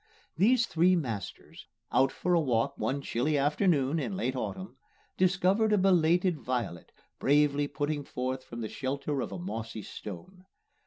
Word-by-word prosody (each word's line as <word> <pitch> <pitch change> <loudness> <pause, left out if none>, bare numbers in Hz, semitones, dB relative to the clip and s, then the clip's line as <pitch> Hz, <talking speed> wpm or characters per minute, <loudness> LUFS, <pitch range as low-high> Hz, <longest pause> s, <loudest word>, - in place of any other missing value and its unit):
These 240 +4 +4
three 180 -2 +3
masters, 115 - -5 0.2
out 135 - +3
for 180 - -1
a 170 - +5
walk 120 -7 0
one 140 +1 -2
chilly 145 +6 0
afternoon 150 0 +2
in 190 +5 -3
late 130 -8 -1
autumn, 185 +8 -5 0.4
discovered 190 +4 +2
a - - +5
belated 180 -2 +3
violet 120 -10 -3 0.3
bravely 145 0 +3
putting 145 +1 -2
forth 130 0 -4
from 120 -2 -8
the 110 - -3
shelter 140 +3 -3
of - - -4
a - - -5
mossy 115 - -5
stone. 180 - -9
145 Hz, 150 wpm, -29 LUFS, 130-180 Hz, 0.4 s, a